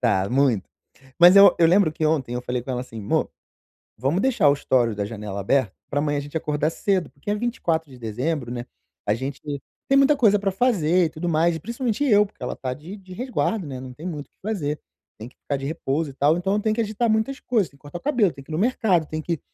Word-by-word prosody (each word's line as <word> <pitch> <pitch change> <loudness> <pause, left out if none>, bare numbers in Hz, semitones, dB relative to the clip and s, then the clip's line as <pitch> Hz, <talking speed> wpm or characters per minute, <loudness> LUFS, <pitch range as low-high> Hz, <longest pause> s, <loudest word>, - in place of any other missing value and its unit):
Tá 95 +1 +2
muito. 125 -7 +2 0.5
Mas 175 +1 +8
eu 200 -1 +9
eu 165 - +6
lembro 175 -2 +4
que 155 - -3
ontem 145 -6 0
eu 125 - -3
falei 125 0 -2
com 130 - -7
ela 125 -1 -2
assim: 115 -3 -9
"Mô, 100 - 0 0.7
vamos 135 - 0
deixar 240 - +3
o - - +5
estore 120 -5 +1
da 100 0 -2
janela 105 -2 -6
aberta 115 0 +1 0.2
pra 145 - 0
amanhã 145 -1 0
a - - -1
gente 145 +3 -11
acordar 150 0 -1
cedo", 190 -4 0
porque 140 +9 -9
é 205 - +2
24 170 - -1
de 130 - -12
dezembro, 125 +4 -2
né, 120 0 -5 0.4
a 105 - +3
gente 130 +5 -5 0.5
tem 275 - +5
muita 275 +2 +5
coisa 210 -6 +4
pra 195 -1 0
fazer 185 -6 +2
e - - -1
tudo 160 +2 -5
mais. 165 +2 +3
E - - -5
principalmente 235 - -2
eu, 210 -5 +5
porque 195 - -19
ela - - -3
tá 130 -1 -4
de 160 +8 -9
de 185 -1 -12
resguardo, 225 -4 -1
né, 130 -2 -6
não 130 -1 -8
tem 160 +8 -8
muito 150 -4 -5
o - - -54
que - - -50
fazer, 150 -8 -2 0.4
tem 115 +3 -8
que - - -29
ficar 145 - -3
de 135 - -6
repouso 155 0 -2
e - - -16
tal. 145 +4 +3
Então 190 +2 0
eu 210 - +2
tenho 215 0 +1
que 235 - +1
agitar 220 +2 -1
muitas 220 +6 0
coisas, 220 -8 0
tem 140 - -22
que - - -36
cortar 145 +4 -8
o - - -25
cabelo, 240 - +2
tem 135 - -12
que - - -24
ir - - -4
no 155 - -1
mercado, 205 -7 +2
tem 155 +1 -4
que 165 -2 -2
160 Hz, 260 wpm, -23 LUFS, 135-200 Hz, 0.7 s, eu